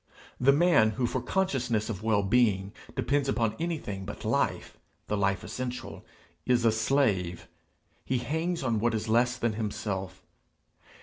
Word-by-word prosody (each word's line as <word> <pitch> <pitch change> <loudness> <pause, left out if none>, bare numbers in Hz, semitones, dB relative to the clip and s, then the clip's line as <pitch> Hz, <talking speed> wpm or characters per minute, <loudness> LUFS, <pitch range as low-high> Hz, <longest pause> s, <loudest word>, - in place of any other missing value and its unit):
The 130 +2 +5
man 145 -7 +4
who 125 - +1
for - - -1
consciousness 125 - 0
of 105 -4 -4
well 110 -2 +2
being 100 -2 +2 0.2
depends 140 0 0
upon 115 -5 +1
anything 155 - -3
but - - -8
life, - - 0 0.3
the 105 - -1
life 100 -1 0
essential, 125 -1 -5 0.4
is 120 -2 +2
a 115 - +6
slave; 110 -7 0 0.6
he 130 - 0
hangs 160 +6 -2
on 115 -4 +1
what 115 +1 +1
is 110 +1 -3
less 120 +3 +2
than 115 -2 0
himself. 105 -3 -4
115 Hz, 145 wpm, -28 LUFS, 105-130 Hz, 0.6 s, a